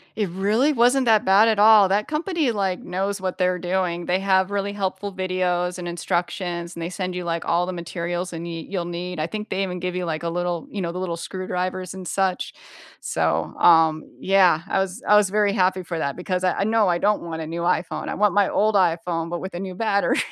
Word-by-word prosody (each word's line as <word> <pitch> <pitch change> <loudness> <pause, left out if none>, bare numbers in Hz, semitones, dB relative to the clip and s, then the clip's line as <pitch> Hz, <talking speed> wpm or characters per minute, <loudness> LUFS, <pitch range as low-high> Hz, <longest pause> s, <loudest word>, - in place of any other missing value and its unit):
It 210 -4 -1
really 215 - +1
wasn't 250 +2 +3
that 220 0 +4
bad 200 +4 +6
at 220 -2 +2
all. 210 -2 +7
That 205 +2 +1
company, 310 -3 0
like, 195 -4 -1
knows 195 +2 -3
what 185 -1 -3
they're 180 -1 +1
doing; 175 -1 -1
they 185 +1 +1
have 190 0 +2
really 200 0 -2
helpful 195 0 -3
videos, 180 -1 -1
and 175 -1 -6
instructions, 175 0 -3
and 170 - -7
they 170 - -3
send 185 0 -4
you, 180 - -3
like, 170 -1 -3
all 175 +1 +1
the 185 - -4
materials 175 +1 -4
and 165 +1 -6
y 165 -1 -6
you'll 180 -3 -3
need, 175 0 -5
I 155 - -1
think 215 +2 -6
they 195 +1 -1
even 180 -1 -4
give 180 0 -3
you 180 -1 -2
the 165 +1 -2
little 175 -1 -2
you 200 - -4
know, 170 -1 -2
the 180 - -5
little 170 -2 -3
screwdrivers, 185 0 -4
and 185 -2 -8
such? 190 -2 -1 0.5
So, - - -1
um, 160 -2 +5 0.2
yeah, 185 -4 +4
I - - 0
was 190 +5 -3
I 210 - +6
was 205 -2 +4
very 205 0 +2
happy 185 -2 +1
for 170 -1 -4
that 140 -2 -2
because 180 +1 -3
I 180 - +2
I - - +2
no, 220 -1 +2
I 175 -1 +2
don't 210 +3 +1
want 160 -1 -5
a 155 - -5
new 170 +1 -4
iPhone, 175 0 -1
I - - -3
want 210 -2 +2
my 205 -1 +3
old 215 0 +2
iPhone, 170 -2 +1
but 175 0 -3
with 190 -1 -6
a 175 - -5
new 190 -1 -6
battery. 200 -2 +1
185 Hz, 235 wpm, -23 LUFS, 175-200 Hz, 0.5 s, all